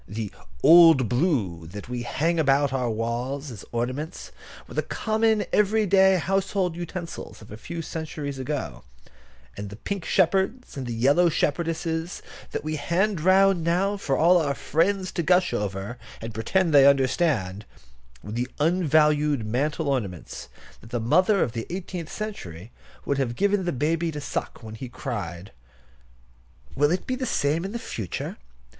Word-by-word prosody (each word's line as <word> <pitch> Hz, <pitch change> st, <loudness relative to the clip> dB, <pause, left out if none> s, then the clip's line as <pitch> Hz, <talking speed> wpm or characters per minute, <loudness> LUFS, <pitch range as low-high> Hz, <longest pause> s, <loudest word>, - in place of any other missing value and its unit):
The 105 Hz, -1 st, -5 dB, 0.3 s
"old 165 Hz, -7 st, +8 dB
blue" 115 Hz, -, 0 dB
that 100 Hz, +5 st, -9 dB
we 125 Hz, 0 st, -4 dB
hang 165 Hz, +8 st, 0 dB
about 140 Hz, -2 st, +3 dB
our 125 Hz, -2 st, 0 dB
walls 120 Hz, +5 st, -3 dB
as 105 Hz, -5 st, -9 dB
ornaments 130 Hz, +7 st, -4 dB, 0.4 s
were -, -, -11 dB
the -, -, +1 dB
common 220 Hz, -1 st, 0 dB
every 210 Hz, +1 st, +3 dB
day 190 Hz, 0 st, +5 dB
household 190 Hz, -1 st, 0 dB
utensils 175 Hz, 0 st, -7 dB
of 105 Hz, -, -14 dB
a -, -, -6 dB
few 165 Hz, +9 st, -6 dB
centuries 150 Hz, -4 st, -5 dB
ago; 145 Hz, +2 st, -4 dB, 0.7 s
and 100 Hz, 0 st, -6 dB
the 100 Hz, -, -9 dB
pink 195 Hz, -, -4 dB
shepherds 190 Hz, +9 st, +1 dB
and 135 Hz, -3 st, -5 dB
the 120 Hz, -, -3 dB
yellow 145 Hz, +9 st, +4 dB
shepherdesses 165 Hz, +2 st, -2 dB, 0.3 s
that -, -, -3 dB
we 155 Hz, 0 st, -2 dB
hand 170 Hz, +5 st, 0 dB
round 190 Hz, 0 st, +4 dB
now 185 Hz, +5 st, +1 dB
for 150 Hz, -9 st, -1 dB
all 175 Hz, +3 st, +5 dB
our 140 Hz, -3 st, -1 dB
friends 185 Hz, +6 st, 0 dB
to -, -, -2 dB
gush 180 Hz, +2 st, +3 dB
over, 100 Hz, +4 st, -3 dB, 0.2 s
and 115 Hz, 0 st, -7 dB
pretend 160 Hz, -, +1 dB
they 140 Hz, -1 st, +8 dB
understand, 130 Hz, -, +2 dB, 0.6 s
were 105 Hz, -, -8 dB
the 120 Hz, +3 st, -2 dB
unvalued 150 Hz, -5 st, +3 dB
mantel 145 Hz, +7 st, -1 dB
ornaments 105 Hz, -11 st, -3 dB, 0.3 s
that 115 Hz, -, -15 dB
the 120 Hz, -, -2 dB
mother 185 Hz, -, +3 dB
of -, -, -2 dB
the 115 Hz, -1 st, -5 dB
eighteenth 180 Hz, -3 st, -5 dB
century 110 Hz, -, -7 dB, 0.3 s
would 140 Hz, -1 st, 0 dB
have 120 Hz, -3 st, -1 dB
given 200 Hz, +1 st, +1 dB
the 175 Hz, -, 0 dB
baby 160 Hz, +5 st, 0 dB
to 150 Hz, -, -5 dB
suck 140 Hz, -, -5 dB
when 110 Hz, -1 st, -8 dB
he 120 Hz, +3 st, -7 dB
cried. 100 Hz, -, -5 dB, 1.2 s
Will 145 Hz, +1 st, +3 dB
it 180 Hz, +3 st, -1 dB
be 255 Hz, -, -1 dB
the 255 Hz, 0 st, -3 dB
same 155 Hz, -5 st, 0 dB
in 195 Hz, -, -4 dB
the 235 Hz, -, -3 dB
future? 115 Hz, -, -5 dB
150 Hz, 160 wpm, -25 LUFS, 120-180 Hz, 1.2 s, old